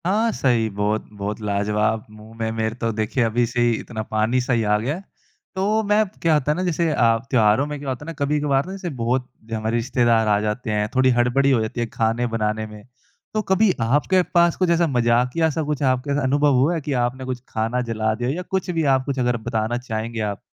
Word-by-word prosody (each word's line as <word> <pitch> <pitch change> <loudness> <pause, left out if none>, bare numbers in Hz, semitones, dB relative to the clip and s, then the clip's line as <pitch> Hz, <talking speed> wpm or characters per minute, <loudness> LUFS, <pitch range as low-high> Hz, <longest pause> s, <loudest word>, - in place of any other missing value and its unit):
हाँ, 215 +5 +2
सही। 120 -4 +1
बहुत-बहुत 105 0 -3
लाजवाब। 105 +1 0
मुँह 110 +1 -14
में 110 -1 -2
मेरे 110 0 -2
तो 115 -2 -2
देखिए 110 +3 -1
अभी 120 +1 +1
से 120 +1 -1
ही 120 0 +4
इतना 110 -2 -6
पानी-सा 120 +4 0
ही 115 -2 +2
आ 105 0 +2
गया 130 +8 -2
है। 190 - -9 0.5
तो 210 +4 +1
मैं 210 +1 +3 0.2
क्या 165 -1 +3
होता 150 -1 +2
है - - 0
ना 185 - -1
जैसे 170 -2 0
अ, 115 -5 +3
त्योहारों 110 +1 +3
में 150 0 -4
क्या 140 -1 -5
होता 130 +3 -4
है - - -13
ना 165 - -5
कभी-कभार 145 -1 +1
ना 185 - -7
जैसे 190 -2 -5
बहुत 125 +2 0 0.3
हमारे 110 +1 -1
रिश्तेदार 120 -2 +2
आ 105 -1 +3
जाते 110 +2 -2
हैं, 105 0 0
थोड़ी 130 0 +4
हड़बड़ी 135 +3 +3
हो 120 -4 +3
जाती 110 +2 -4
है - - +1
खाने 115 +2 0
बनाने 110 -1 -1
में। 105 -1 -12 0.5
तो 215 - +1
कभी 195 +1 +3
आपके 145 +10 +3
पास 170 -1 +4
कुछ 185 -2 +1
ऐसा 170 0 +3
मज़ाकिया-सा 125 +5 +1
कुछ 150 -1 -2
आपके 130 +2 +1
अनुभव 145 +2 +3
हुआ 145 +7 +3
है 165 - -2
कि 145 0 -3
आपने 130 +2 -4
कुछ 130 -1 -4
खाना 115 +3 -1
जला 110 -1 0
दिया 120 +2 -2
या 160 +7 -2
कुछ 190 0 -3
भी 165 -2 0
आप 130 0 -2
कुछ 140 -2 -2
अगर 125 -1 +1
बताना 115 0 -1
चाहेंगे 115 -2 -4
आप? 105 -2 -3
125 Hz, 220 wpm, -22 LUFS, 110-150 Hz, 0.5 s, ही